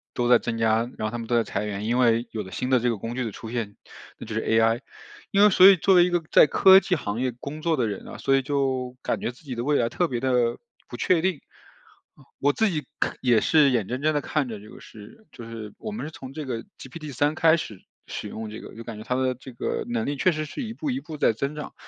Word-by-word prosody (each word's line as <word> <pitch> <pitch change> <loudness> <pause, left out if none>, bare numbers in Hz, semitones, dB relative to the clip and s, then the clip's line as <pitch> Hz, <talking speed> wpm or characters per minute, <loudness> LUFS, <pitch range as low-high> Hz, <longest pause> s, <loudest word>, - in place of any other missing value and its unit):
都 120 0 0
在 120 -1 +6
增 115 -1 -3
加， 110 -1 +3 0.2
然 110 - -2
后 - - -4
他 120 - -4
们 115 - -6
都 120 - +1
在 115 - +3
裁 100 - -3
员。 105 0 -4
因 120 +3 +1
为 115 -1 +3
有 110 - -3
了 95 - -11
新 125 +8 -3
的 130 - +5
这 120 +1 +1
个 115 - -1
工 115 +4 -5
具 130 - -1
的 110 - -4
出 110 +3 -9
现， 110 -4 -3 0.4
那 - - -9
就 110 - -7
是 110 - -1
AI， 115 +1 +2 0.5
因 200 0 +4
为 210 - +8
所 185 +1 +8
以 195 - +9
作 190 +4 +3
为 175 -1 +7
一 - - 0
个 175 -1 0
在 - - +7
科 190 +6 +7
技 185 - 0
行 115 -5 -3
业 130 -1 0
工 150 +4 -7
作 165 -1 +1
的 120 -3 +1
人 100 - -6
啊， - - -8
所 135 0 +2
以 135 - +3
就 130 -2 -1
感 - - -2
觉 120 - -2
自 125 - -21
己 135 -4 -6
的 120 0 -3
未 145 +1 +2
来 115 - +1
特 175 - 0
别 120 -5 -3
的 125 -2 +1 0.3
不 120 - -7
确 175 +4 +2
定。 180 -4 0 1.0
我 145 +1 +3
自 220 +8 +1
己 155 -4 -2 0.2
可 - - -1
也 120 -4 +3
是 150 -3 +4
眼 115 -6 0
睁 125 +3 -4
睁 155 - +2
地 145 - +1
看 145 -3 -1
着 110 -3 -6
这 105 +1 -14
个 - - -12
是 110 - -14
就 115 -1 -10
是 110 -2 -8
我 215 - -6
们 210 - -5
是 - - -8
从 135 -3 -10
这 155 0 -6
个 115 -3 -4 0.2
GPT 145 +2 -9
3 145 +5 +1
开 160 0 +4
始 105 - -7 0.2
使 - - -5
用 110 0 -6
这 110 - -8
个， - - -11
就 115 - -8
感 115 -2 -8
觉 105 - -8
它 125 - -2
的 130 0 0
这 130 +1 -12
个 120 - -3
能 120 -2 -1
力 145 - -1
确 185 +7 +3
实 155 -1 -3
是 255 - -6
一 225 0 -5
步 300 +5 -4
一 260 0 -1
步 165 - -9
在 - - +4
增 140 +6 -3
长， 150 - -7
125 Hz, 315 characters per minute, -25 LUFS, 115-155 Hz, 1.0 s, 以